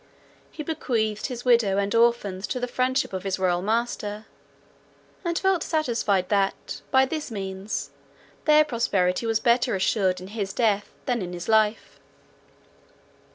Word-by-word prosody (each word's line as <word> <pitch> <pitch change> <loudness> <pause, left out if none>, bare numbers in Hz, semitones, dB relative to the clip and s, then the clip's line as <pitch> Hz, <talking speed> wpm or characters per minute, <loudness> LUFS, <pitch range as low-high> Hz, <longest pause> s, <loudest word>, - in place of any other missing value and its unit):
He 305 - -7
bequeathed 225 -9 -1
his 245 -2 -7
widow 230 -6 +4
and 200 +1 0
orphans 230 -5 +2
to 250 - -2
the 245 - -2
friendship 255 -2 0
of 190 - -3
his 190 0 -2
royal 180 -2 +1
master, 215 0 -2 1.0
and 340 -2 -1
felt 380 -3 +2
satisfied 230 - 0
that, 200 -2 -1
by 265 0 +5
this 305 +2 -4
means, 195 -1 -4 0.5
their 305 0 +6
prosperity 220 -6 0
was 225 -1 +2
better 240 -1 +2
assured 190 -1 +1
in 185 +1 -9
his 200 -2 -4
death 205 -3 +1
than 245 -3 0
in 180 -1 -5
his 175 0 -6
life. 220 0 +1
220 Hz, 145 wpm, -25 LUFS, 195-245 Hz, 1.0 s, their